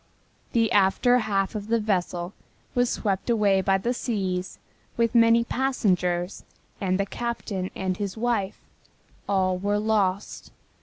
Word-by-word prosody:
The 230 -3 +2
after 205 +6 +4
half 195 -4 0
of 210 -1 -5
the 230 +1 +2
vessel 180 -3 -1 0.4
was 245 -1 +2
swept 195 0 -2
away 205 -4 +3
by 195 +1 +2
the 235 +6 -1
seas 190 -7 -3 0.4
with 230 -1 +2
many 230 0 +5
passengers 185 -9 0 0.4
and 185 -1 0
the 200 - +1
captain 205 -4 -4
and 190 -1 -2
his 200 0 -4
wife. 220 -4 -1 0.7
All 185 -2 +1
were 205 +2 0
lost. 210 -2 -1
200 Hz, 135 wpm, -25 LUFS, 190-230 Hz, 0.7 s, many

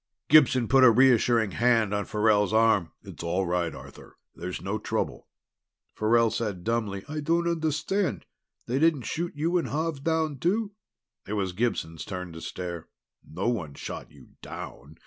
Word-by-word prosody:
Gibson 130 -6 +5
put 135 +2 +5
a 130 - +9
reassuring 120 -3 +4
hand 115 -1 +2
on 105 0 -1
Farrell's 105 -1 +2
arm. 110 -7 +3
"It's - - -10
all 90 +3 -1
right, 85 -1 0
Arthur. - - -13 0.2
There's 90 +2 -6
no 100 +3 -3
trouble." - - -3 0.7
Farrell 115 +1 +3
said 100 -6 -3
dumbly, 110 -3 -2
"I 155 +1 -4
don't 165 +3 +1
understand. 160 - -1 0.4
They 125 +3 -1
didn't 155 -4 +3
shoot 170 +2 -3
you 165 +4 +1
and 160 - -3
Xav 155 +3 -2
down 160 -4 0
too?" 205 - 0 0.6
It 105 - -4
was 95 -3 -1
Gibson's 90 -7 -2
turn 90 -2 -6
to 80 - -9
stare. 85 -2 -6 0.4
"No 90 +7 -4
one 85 -12 -3
shot - - -7
you - - -17
down! 75 +3 -9
115 Hz, 160 wpm, -27 LUFS, 95-150 Hz, 0.7 s, a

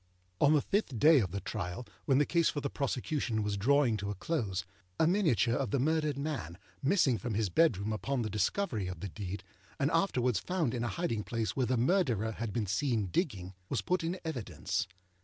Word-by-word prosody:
On 145 +1 +5
the 145 - +3
fifth 195 - 0
day 150 +5 +7
of 100 -6 0
the 100 +3 -4
trial, 95 +2 -4 0.2
when 135 - +3
the 145 - +4
case 170 +1 +2
for 145 - -2
the 140 -1 -3
prosecution 130 -4 -1
was 105 -1 -1
drawing 125 +2 +3
to 100 0 -4
a 105 - -3
close, 95 - -2 0.3
a - - +5
miniature 160 - +3
of 130 -1 0
the 135 - +1
murdered 155 0 +1
man, 140 - -4 0.2
missing 140 - +3
from 110 +3 -3
his 105 -2 +1
bedroom 110 - +2
upon 125 +3 -1
the 110 - -2
discovery 110 - 0
of 90 -3 -6
the 100 - -4
deed, 95 0 -6 0.4
and 140 +2 +2
afterwards 125 - +2
found 175 -9 -1
in 120 -2 -2
a - - 0
hiding 115 -9 -2
place 110 -5 -2
where 130 - +1
the 130 - +1
Murderer 120 - +2
had 110 0 -4
been 110 0 -1
seen 105 0 0
digging, 95 - -1 0.2
was - - -1
put 180 -1 0
in 175 +3 -2
evidence. 130 -10 -2
125 Hz, 205 wpm, -32 LUFS, 105-150 Hz, 0.4 s, day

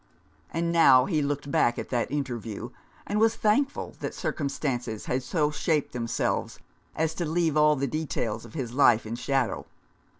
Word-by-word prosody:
And 170 +1 -1
now 135 -7 +6
he 155 -6 0
looked 145 0 -2
back 120 -3 +2
at - - -5
that 120 -2 0
interview, 120 -7 -4 0.3
and 210 - -1
was 225 0 +4
thankful 270 +7 0
that - - -4
circumstances 130 -6 -3
had 130 +1 -1
so 150 +4 0
shaped 150 0 0
themselves 115 -1 -2 0.4
as 160 0 0
to 175 - -3
leave 160 -1 0
all 150 0 +5
the 140 0 -1
details 135 -6 -2
of 115 - -13
his 125 -6 -4
life 120 -5 +4
in 110 - -5
shadow. 135 0 -1
140 Hz, 165 wpm, -27 LUFS, 120-160 Hz, 0.4 s, now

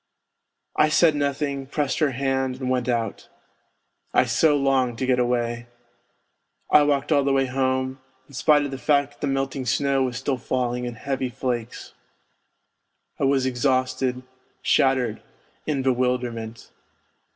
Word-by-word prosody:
I 155 - +4
said 155 +1 +4
nothing, 140 -1 -2
pressed 140 -1 -1
her 155 -3 +3
hand 130 0 -1
and 130 -1 -2
went 125 -1 0
out. 115 -3 -2 0.9
I - - +5
so 145 +5 +3
longed 135 -3 +1
to 130 - -1
get 130 -1 +2
away.... 120 -1 -1 1.0
I 150 - +7
walked 145 0 +1
all 145 -2 +4
the 140 - +1
way 135 0 +2
home, 130 0 -1 0.3
in 140 - -18
spite 145 +2 +3
of 140 - -5
the 135 - -6
fact 145 -1 +2
that 145 - -24
the 145 - -1
melting 135 -1 -2
snow 135 +2 +1
was 125 -2 -1
still 135 0 -1
falling 125 0 -2
in 120 -1 -5
heavy 130 +1 -3
flakes. 125 -2 -4 1.3
I - - +1
was 135 -1 +2
exhausted, 130 0 0 0.4
shattered, 130 -4 +2 0.5
in 140 -4 -1
bewilderment. 125 -3 -2
130 Hz, 145 wpm, -24 LUFS, 125-140 Hz, 1.3 s, I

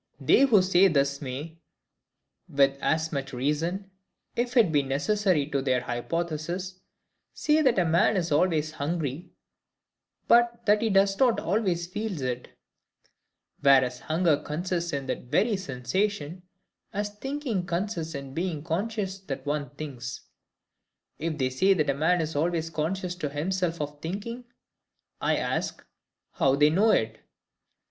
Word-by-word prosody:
They 275 - +5
who 210 -7 +5
talk 185 -1 +4
thus 140 0 +1
may, 145 +5 -6 0.9
with 140 -1 +3
as 160 0 0
much 140 -1 -4
reason, 165 +9 -2 0.4
if 245 +2 -1
it 215 -8 +5
be 145 -2 +3
necessary 150 +4 +1
to 140 - +1
their 130 -2 +1
hypothesis, 170 +8 -3 0.6
say 305 +1 +2
that 260 -7 +3
a 180 - +3
man 170 +6 +3
is 175 -3 -1
always 155 0 +2
hungry, 155 0 -3 1.0
but 235 0 +4
that 210 0 +4
he 225 - +1
does 195 0 +3
not 250 -3 +4
always 180 -2 0
feel 205 0 -4
it; 125 -1 -3 1.1
whereas 130 -3 +4
hunger 160 -1 +2
consists 170 +3 -3
in 140 -1 -3
that - - -4
very 210 - +2
sensation, 180 +3 -2 0.5
as 205 +1 -2
thinking 240 -4 -3
consists 170 -2 -2
in 140 -1 -7
being 165 -2 -2
conscious 195 +3 -2
that 135 -7 -6
one 145 0 -2
thinks. 130 -5 -6 1.0
If 160 0 -2
they 130 -3 0
say 190 +9 +3
that 150 -5 +2
a - - -1
man 165 +5 +2
is 160 -1 -4
always 165 +1 0
conscious 175 +4 -2
to 150 -5 -3
himself 170 +3 -1
of 145 0 -5
thinking, 210 +9 -5 0.8
I - - +2
ask, - - -2 0.5
How 135 0 +2
they 150 +1 +4
know 205 +7 +4
it? 110 - +1
165 Hz, 140 wpm, -27 LUFS, 145-195 Hz, 1.1 s, They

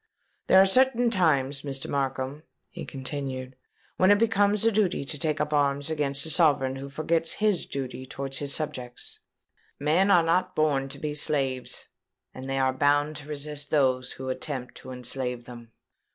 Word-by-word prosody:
"There 190 - +7
are 190 - +7
certain 245 +3 +3
times, 145 - +1
Mr. 135 -2 -4
Markham," 135 +1 -2 0.3
he - - -7
continued, 130 -1 -5 0.4
"when 185 - +4
it 205 - +6
becomes 210 -1 +2
a 230 - +5
duty 195 -8 0
to 150 +1 -4
take 155 -1 -1
up 150 0 -1
arms 145 +1 +1
against 140 -2 0
a 160 - 0
sovereign 140 -6 +3
who 135 +1 -7
forgets 160 +3 -1
his 210 -4 0
duty 130 -1 -5
towards 135 +1 -3
his 140 -1 -2
subjects. 135 -5 -5 0.6
Men 165 +7 +2
are 175 -4 +6
not 180 +3 +1
born 140 -3 +1
to - - -9
be 150 -1 -4
slaves; 135 -4 0 0.5
and 130 - -8
they 135 - -1
are 130 -1 +2
bound 145 +3 +2
to 145 0 -9
resist 150 0 -3
those 130 -4 +1
who 130 0 -6
attempt 130 -1 -4
to - - -11
enslave 125 -1 -3
them." 120 -2 -11
145 Hz, 170 wpm, -26 LUFS, 135-165 Hz, 0.6 s, There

